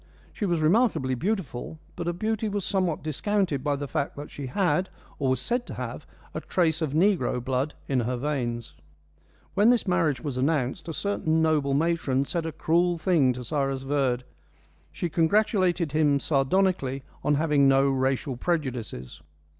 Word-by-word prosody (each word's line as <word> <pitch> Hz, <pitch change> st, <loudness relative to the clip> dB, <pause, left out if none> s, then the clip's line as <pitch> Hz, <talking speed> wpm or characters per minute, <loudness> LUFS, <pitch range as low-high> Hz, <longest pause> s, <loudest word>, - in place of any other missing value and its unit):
She 205 Hz, -, -2 dB
was 170 Hz, -3 st, 0 dB
remarkably 160 Hz, -, +2 dB
beautiful, 160 Hz, -, -3 dB, 0.2 s
but 170 Hz, -1 st, -4 dB
her 175 Hz, -, 0 dB
beauty 215 Hz, +4 st, -1 dB
was 200 Hz, -2 st, -2 dB
somewhat 185 Hz, -5 st, 0 dB
discounted 160 Hz, -1 st, 0 dB
by 145 Hz, -1 st, +1 dB
the 145 Hz, 0 st, -4 dB
fact 140 Hz, -1 st, -2 dB
that 145 Hz, +1 st, -8 dB
she 140 Hz, -2 st, -6 dB
had 185 Hz, +5 st, +1 dB, 0.3 s
or 135 Hz, -3 st, +1 dB
was 130 Hz, -1 st, +1 dB
said 240 Hz, -, -2 dB
to -, -, -7 dB
have -, -, -6 dB, 0.3 s
a -, -, -4 dB
trace 165 Hz, -3 st, +1 dB
of 150 Hz, -3 st, -1 dB
negro 165 Hz, -7 st, +2 dB
blood 130 Hz, +4 st, -2 dB
in 135 Hz, -2 st, +1 dB
her 125 Hz, +1 st, -1 dB
veins. 120 Hz, -4 st, -3 dB, 0.8 s
When 205 Hz, +3 st, +4 dB
this 240 Hz, -4 st, +3 dB
marriage 165 Hz, -7 st, +2 dB
was 130 Hz, 0 st, -4 dB
announced, 145 Hz, +3 st, 0 dB
a 165 Hz, -, -3 dB
certain 160 Hz, -2 st, 0 dB
noble 150 Hz, -4 st, +2 dB
matron 145 Hz, -4 st, +1 dB
said 165 Hz, +2 st, -2 dB
a -, -, -3 dB
cruel 170 Hz, +3 st, +1 dB
thing 160 Hz, -7 st, +3 dB
to 125 Hz, 0 st, -7 dB
Cyrus 135 Hz, +1 st, -1 dB
Verd. 135 Hz, -3 st, 0 dB, 0.7 s
She 175 Hz, -, -3 dB
congratulated 175 Hz, 0 st, +2 dB
him 150 Hz, -2 st, +3 dB
sardonically 140 Hz, -1 st, +1 dB, 0.2 s
on 145 Hz, 0 st, +3 dB
having 145 Hz, -2 st, +3 dB
no 135 Hz, 0 st, +4 dB
racial 135 Hz, 0 st, 0 dB
prejudices. 125 Hz, -, -3 dB
150 Hz, 165 wpm, -26 LUFS, 135-175 Hz, 0.8 s, When